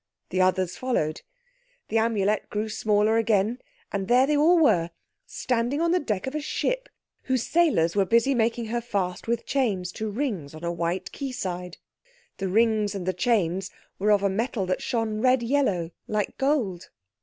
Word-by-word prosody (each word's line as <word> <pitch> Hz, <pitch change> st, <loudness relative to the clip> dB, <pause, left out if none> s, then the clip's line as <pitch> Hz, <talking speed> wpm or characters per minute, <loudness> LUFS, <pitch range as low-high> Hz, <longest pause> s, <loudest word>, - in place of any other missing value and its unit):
The 185 Hz, -, +1 dB
others 185 Hz, -1 st, +1 dB
followed. 200 Hz, -12 st, -1 dB, 0.7 s
The 225 Hz, -, +2 dB
Amulet 215 Hz, -2 st, 0 dB
grew 215 Hz, +1 st, -2 dB
smaller 215 Hz, 0 st, +2 dB
again, 225 Hz, +1 st, +1 dB, 0.3 s
and 195 Hz, -2 st, -2 dB
there 250 Hz, +3 st, +5 dB
they 300 Hz, +2 st, +1 dB
all 320 Hz, +5 st, +5 dB
were, 175 Hz, -, +3 dB, 0.4 s
standing 245 Hz, +3 st, -1 dB
on 335 Hz, 0 st, +2 dB
the 360 Hz, -, +3 dB
deck 210 Hz, -, -2 dB
of 265 Hz, -, -4 dB
a 305 Hz, -, -2 dB
ship -, -, -2 dB, 0.4 s
whose 260 Hz, -3 st, 0 dB
sailors 285 Hz, -, +2 dB
were 200 Hz, -, +4 dB
busy 230 Hz, +7 st, +3 dB
making 235 Hz, -1 st, 0 dB
her 235 Hz, +2 st, -2 dB
fast 195 Hz, -5 st, -3 dB
with 235 Hz, 0 st, -1 dB
chains 200 Hz, -10 st, 0 dB
to 220 Hz, +3 st, -4 dB
rings 205 Hz, -, -3 dB
on 155 Hz, -, -11 dB
a 170 Hz, -, -1 dB
white 170 Hz, +2 st, -2 dB
quay 275 Hz, -2 st, -5 dB
side. 180 Hz, -6 st, -5 dB, 0.6 s
The 195 Hz, -, -2 dB
rings 215 Hz, 0 st, +2 dB
and 190 Hz, -3 st, -4 dB
the 185 Hz, -, 0 dB
chains 190 Hz, -2 st, 0 dB, 0.3 s
were 205 Hz, +2 st, +1 dB
of 205 Hz, -1 st, +3 dB
a -, -, +4 dB
metal 215 Hz, 0 st, -1 dB
that 185 Hz, 0 st, -1 dB
shone 225 Hz, -3 st, -1 dB
red 255 Hz, -1 st, +3 dB
yellow 230 Hz, -10 st, +1 dB, 0.2 s
like 210 Hz, -2 st, -2 dB
gold. 255 Hz, -, 0 dB
215 Hz, 180 wpm, -26 LUFS, 185-250 Hz, 0.7 s, there